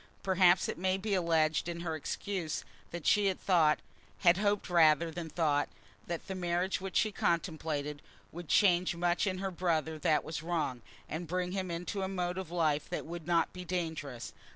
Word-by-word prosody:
Perhaps 185 -1 +4
it - - -4
may 185 +1 +1
be 200 +1 -2
alleged 165 -3 +2
in 170 0 -4
her 165 -2 -2
excuse 170 +1 -3 0.2
that 170 -2 -7
she 205 -1 +4
had 190 - 0
thought, 165 -5 +4 0.4
had 175 -2 +6
hoped 205 0 +1
rather 165 -1 +4
than 165 0 -5
thought, 150 -4 +1 0.4
that 170 -1 -4
the 190 - -5
marriage 180 +1 -1
which 190 -1 -6
she 215 - +3
contemplated 160 -5 -1 0.3
would 175 0 -8
change 180 -2 +4
much 175 +3 +1
in 185 -1 -1
her 190 0 -3
brother 160 -3 -1
that 150 0 +2
was 155 -1 -5
wrong, 155 -7 -2 0.3
and 165 +2 -5
bring 180 +2 -1
him 190 -1 -2
into 175 +4 -3
a 190 - -1
mode 180 -1 -2
of 185 -4 -6
life 155 -4 0
that - - -3
would 170 0 -7
not 170 -1 +2
be 180 - -7
dangerous. 160 -8 -4
175 Hz, 185 wpm, -32 LUFS, 160-185 Hz, 0.4 s, had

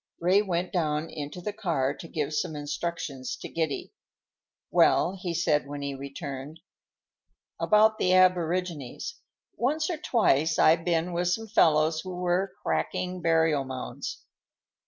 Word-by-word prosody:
Ray 185 +4 +4
went 180 -3 -2
down 155 -2 0
into 150 +4 -6
the 210 +3 -4
car 145 -9 0
to 165 - -10
give 155 -2 -3
some 155 +1 -1
instructions 145 -3 -4
to - - -8
Giddy. 160 -4 -3 0.8
"Well," 175 - +4
he 180 -2 -4
said 155 -4 +1
when 145 0 -6
he 140 0 -3
returned, 140 +2 -7 1.0
"about 215 +1 +4
the 185 - +2
aborigines: 180 -5 +1 0.4
once 305 +7 0
or 335 - -2
twice 165 - +2
I've 165 +1 +5
been 170 0 0
with 175 +1 0
some 225 +5 -1
fellows 160 -5 +3
who 185 +1 -7
were 180 +2 0
cracking 180 0 -2
burial 160 -3 +3
mounds. 130 -1 -6
165 Hz, 135 wpm, -27 LUFS, 150-180 Hz, 1.0 s, I've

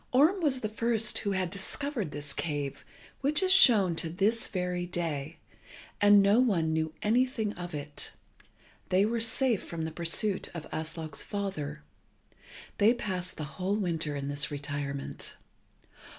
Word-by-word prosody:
Orm 315 +9 +4
was 270 -5 +1
the 215 - -1
first 225 0 +2
who 200 -2 -1
had 185 -2 -1
discovered 215 - -2
this 145 -1 -3
cave, 145 -4 -3 0.4
which 295 +6 +1
is 370 - +4
shown 215 - +7
to 165 - 0
this 205 +7 +1
very 180 -1 -2
day, 165 -3 -3 0.6
and 205 -1 +7
as 200 - +5
no 230 - +5
one 175 -11 +2
knew 160 0 -1
anything 225 -1 +1
of 175 -2 -7
it, 145 0 -3 0.8
they 190 +2 +4
were 230 +1 -1
safe 230 -1 +1
from 165 -1 -5
the 160 - -4
pursuit 170 +5 0
of 160 - -6
Aslog's 160 -1 -4
father. 155 -8 -4 1.0
They 220 +4 +5
passed 185 -6 -4
the 155 - -4
whole 180 +7 -2
winter 165 -7 -2
in 140 0 -4
this 145 0 0
retirement. 140 -1 -4
185 Hz, 150 wpm, -29 LUFS, 155-220 Hz, 1.0 s, shown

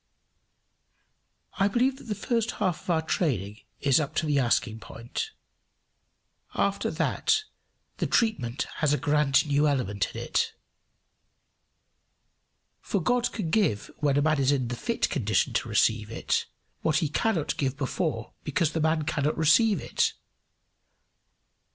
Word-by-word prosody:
] - - -46
I - - +5
believe 250 +5 +1
that - - -13
the 215 -3 -3
first 230 +3 -1
half 185 -5 -1
of - - -13
our 160 -2 +2
training 110 - -1 0.2
is 135 0 +4
up 150 -3 -3
to 165 - +1
the 145 -2 +2
asking 115 -3 +1
point; 115 - -6 1.3
after - - 0
that 435 -1 +1 0.5
the - - -1
treatment 140 - 0
has 150 -2 +2
a - - +2
grand 145 -2 +2
new 145 0 +2
element 105 -9 -1
in - - -4
it. - - 0 2.3
For 200 - -1
God 245 +6 +1
can 200 -7 -3
give 175 - +1
when 145 -2 +1
a 145 - +3
man 155 -1 +2
is 135 0 +3
in 130 -4 0
the 120 - -3
fit 230 - -1
condition 110 - +1
to - - -1
receive 110 -1 +2
it, 115 - -1 0.3
what 155 -1 +2
he 155 - +1
cannot 165 +1 0
give 135 -1 -1
before 135 -4 -2
because 170 -4 0
the 160 - -1
man 160 0 +2
cannot 150 -1 -1
receive 170 +5 +4
it. - - 0
150 Hz, 145 wpm, -27 LUFS, 130-185 Hz, 2.3 s, I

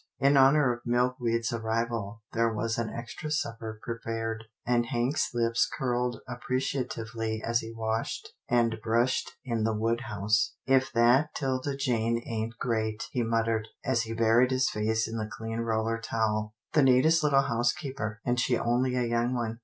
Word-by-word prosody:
In 140 +1 +4
honour 135 -1 +5
of 120 - -8
Milkweed's 120 -1 0
arrival 115 -1 -2
there 115 0 +2
was 115 +1 -1
an 115 -1 -1
extra 120 +6 -6
supper 115 -7 -3
prepared, 115 -1 -4 0.2
and 120 -1 +2
Hank's 120 +4 0
lips 115 -1 +1
curled 125 -2 -1
ap 125 0 -7
preciatively 115 -4 -2
as 115 0 +2
he 115 0 -7
washed 110 0 -3 0.2
and 115 -2 +2
brushed 115 +3 +1
in 115 -3 -1
the 110 0 +1
wood 115 +2 0
house. 105 0 +1
"If 135 0 +3
that 125 +6 +4
'Tilda 135 0 -1
Jane 115 -4 +1
ain't 110 0 -3
great! 110 -3 -1
" - - -31
he 125 - 0
muttered, 115 -1 0 0.2
as 130 -3 +2
he 115 -1 -4
buried 115 +2 +4
his 130 0 +1
face 110 +1 0
in 115 0 -4
the 110 0 -3
clean 115 -1 -5
roller 115 0 0
towel 110 -1 -1
— - - -65
" - - -42
the 150 - +5
neatest 135 +5 +5
little 140 -2 +4
housekeeper, 120 -3 -2
and 125 0 +1
she 125 -1 +2
only 125 +2 +1
a 125 - +1
young 120 +1 0
one. 115 -1 -3
115 Hz, 175 wpm, -28 LUFS, 115-125 Hz, 0.2 s, honour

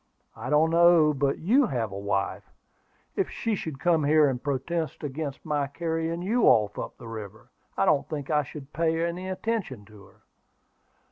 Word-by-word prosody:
"I 115 +3 -6
don't 155 +2 +3
know 170 -2 +5
but 140 0 0
you 245 - +3
have 115 - -2
a - - -7
wife. 100 -2 -2 0.7
If - - 0
she 225 - -2
should 160 -8 -4
come 165 -2 +2
here 150 +1 +5
and 125 -3 -2
protest 150 +5 -3
against 145 0 -5
my 145 -2 0
carrying 165 +3 -3
you 225 +5 +2
off 105 -4 +4
up - - -6
the 115 - -11
river, 110 -2 -9 0.3
I - - +3
don't 140 - +2
think 145 -2 -4
I 150 -1 +3
should 145 0 -10
pay 165 +2 +1
any 180 +2 -4
attention 185 - -3
to 105 -2 -16
her." - - -23
150 Hz, 180 wpm, -27 LUFS, 130-170 Hz, 0.7 s, know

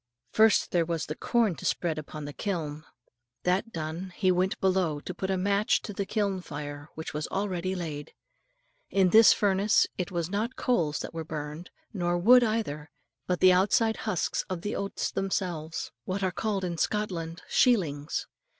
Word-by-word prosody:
First 220 -1 +4
there 175 -2 +3
was 165 -1 -2
the 155 - -5
corn 230 -2 +1
to - - -10
spread 160 -3 0
upon 150 0 -7
the 145 - -6
kiln. 155 -6 -3 0.6
That 190 +6 +1
done, 165 +3 -5
he 185 -3 +3
went 185 +1 +1
below 185 -5 +1
to 185 - -6
put 190 +2 -4
a 190 - +1
match 200 +3 +2
to 210 - -6
the 195 0 -3
kiln 200 -4 0
fire 145 -2 -7
which 160 - -6
was 150 +1 -3
already 190 -2 -2
laid. 155 -5 -6 0.7
In 190 -2 +3
this 225 0 +8
furnace 200 +1 +3
it 180 - -1
was 170 -3 -2
not 215 +7 -2
coals 165 -12 +1
that - - -6
were 165 0 -4
burned, 155 +2 -6 0.2
nor 175 -3 0
wood 245 +8 +7
either, 210 -10 -2 0.4
but 180 -1 -1
the 185 -1 +7
outside 210 +4 +3
husks 210 -6 -1
of 180 -3 -4
the 205 - -2
oats 200 0 -2
themselves, 175 -5 -2
what 190 +1 -2
are 185 - +1
called 200 0 -2
in 170 -2 -3
Scotland 180 -5 -2
"shealings." 160 - +2
180 Hz, 175 wpm, -28 LUFS, 160-200 Hz, 0.7 s, this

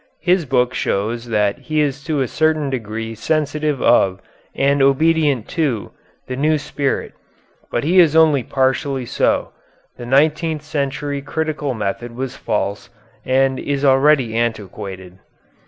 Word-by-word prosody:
His 180 -2 +2
book 125 -1 +1
shows 115 +4 -2
that 105 -3 0
he 155 -1 -2
is 140 -2 0
to 150 -3 0
a 130 - 0
certain 155 0 0
degree 115 -2 -4
sensitive 150 +4 -1
of 95 -5 +3 0.4
and 140 0 +2
obedient 145 -2 +2
to 145 - -1 0.3
the 130 - -5
new 155 +3 +2
spirit; 145 -1 -3 0.6
but 120 - -1
he 175 +5 +4
is 160 -3 +5
only 155 -4 +5
partially 135 +1 0
so. - - 0 0.5
The 120 - -8
nineteenth 155 +3 +2
century 145 -1 -3
critical 150 -2 -3
method 110 +3 -4
was 130 +1 -4
false, 100 -4 -3 0.4
and 130 0 +2
is 140 0 -2
already 135 -3 +4
antiquated.... 95 -5 -4
135 Hz, 135 wpm, -19 LUFS, 120-150 Hz, 0.6 s, is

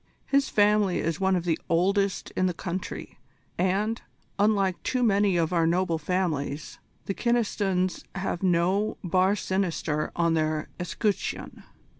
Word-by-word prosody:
His 275 -1 +2
family 205 -2 +3
is 165 0 -1
one 190 -1 +2
of 175 - -1
the 165 -2 +1
oldest 195 +3 +1
in 185 - +1
the 180 - -2
country, 185 +1 -5 0.4
and, 200 +5 0 0.4
unlike 200 -3 +2
too 255 -1 0
many 200 -4 +3
of 165 +1 +1
our 165 -2 +3
noble 170 -1 +1
families, 155 -4 -2 0.3
the 195 - -2
Kynestons 200 -6 0
have 190 -2 -2
no 185 +3 +1
bar 185 +3 +3
sinister 170 -6 -1
on 170 -1 +2
their 155 -1 0
escutcheon." 200 +3 -3
185 Hz, 135 wpm, -27 LUFS, 170-200 Hz, 0.4 s, family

